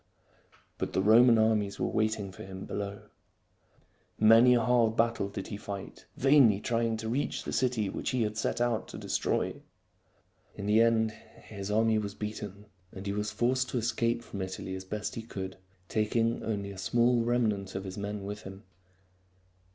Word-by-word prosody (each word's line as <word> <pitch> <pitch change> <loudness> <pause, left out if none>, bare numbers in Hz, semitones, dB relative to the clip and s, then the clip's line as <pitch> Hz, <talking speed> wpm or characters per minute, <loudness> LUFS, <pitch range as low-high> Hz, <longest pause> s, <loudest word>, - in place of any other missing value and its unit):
But - - -3
the 95 - +2
Roman 115 +3 +7
armies 110 -2 +1
were - - 0
waiting 110 -2 -1
for 90 - -10
him 95 0 -8
below. 100 0 -5 1.1
Many 115 +3 +7
a 120 - +3
hard 115 -2 +3
battle 115 -3 +1
did 100 -1 -6
he 100 - -5
fight, 100 -1 -8
vainly 135 -7 +5
trying 115 0 0
to 110 0 -5
reach 125 +6 -1
the - - -5
city 120 -3 +1
which - - -3
he 125 -3 +1
had 105 0 -2
set 115 - -1
out 120 -2 0
to - - -8
destroy. - - -1 0.9
In 100 - -6
the 105 +2 +4
end 115 -1 +3
his 105 -2 -10
army 110 +1 +3
was 100 -1 -5
beaten, 105 -1 -6 0.3
and 95 +1 -9
he 100 - -1
was 105 +1 -2
forced 125 +4 0
to - - -2
escape 115 0 0
from 100 - -7
Italy 95 0 -5
as 95 0 -6
best 105 +2 -4
he 115 - -5
could, 95 -4 -6 0.3
taking 115 +2 0
only 100 -3 -3
a 95 - -9
small 120 +4 +2
remnant 110 -6 0
of 95 - -3
his 95 -1 -6
men 100 0 -4
with 105 +1 -6
him. 95 +2 -10
110 Hz, 175 wpm, -30 LUFS, 100-115 Hz, 1.1 s, Roman